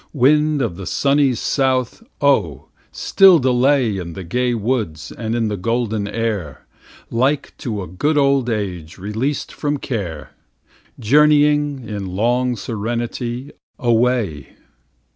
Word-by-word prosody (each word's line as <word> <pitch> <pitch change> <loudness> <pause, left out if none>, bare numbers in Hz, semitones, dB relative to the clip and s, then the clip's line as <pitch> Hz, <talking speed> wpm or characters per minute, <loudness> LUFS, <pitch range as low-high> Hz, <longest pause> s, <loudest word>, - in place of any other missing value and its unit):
Wind 150 +1 +3
of 95 -8 -3
the 95 - -7
sunny 140 -2 +2
south! 130 - 0 0.2
oh, 80 - +1 0.2
still 190 -3 +5
delay 130 -4 +2
In 85 -2 -6
the 95 - -7
gay 120 +8 0
woods 105 - -2
and 115 0 -4
in 115 -2 0
the 105 -1 -3
golden 110 0 -1
air, 105 - -3 0.5
Like 130 +5 0
to 105 -5 -4
a - - -8
good 145 - -1
old 140 -3 +2
age 90 -8 -4
released 110 +9 -3
from 145 -1 -2
care, 85 - -5 0.7
Journeying, 145 +1 +3
in 100 -3 -5
long 120 +4 +1
serenity, 120 +4 -4 0.3
away. 120 - 0
120 Hz, 125 wpm, -19 LUFS, 100-135 Hz, 0.7 s, still